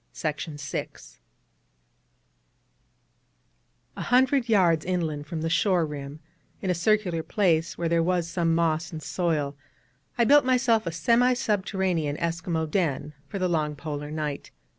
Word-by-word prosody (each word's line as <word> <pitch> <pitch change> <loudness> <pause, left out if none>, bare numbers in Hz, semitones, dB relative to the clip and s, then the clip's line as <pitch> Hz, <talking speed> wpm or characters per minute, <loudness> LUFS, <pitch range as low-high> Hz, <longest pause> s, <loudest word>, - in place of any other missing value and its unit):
A - - -6
hundred 255 0 +3
yards 175 -7 +4
inland 160 -5 -2
from 160 0 -4
the 165 - 0
shore 180 -1 +2
rim, 145 0 -7 0.4
in 190 - -1
a - - +3
circular 180 -1 +1
place 165 -3 +1
where 170 - -1
there 165 0 +2
was 175 0 0
some 170 -1 0
moss 165 -1 0
and 155 -2 -7
soil, 155 -6 -1 0.6
I 240 - +4
built 290 +5 +6
myself 250 -4 +2
a - - -1
semi 235 +10 +3
subterranean 190 -9 -1
Eskimo 165 -1 -2
den 150 -3 -1
for 200 - -5
the 185 -1 0
long 155 -3 0
Polar 145 0 -5
night. 150 -2 -4
170 Hz, 130 wpm, -26 LUFS, 155-195 Hz, 0.6 s, built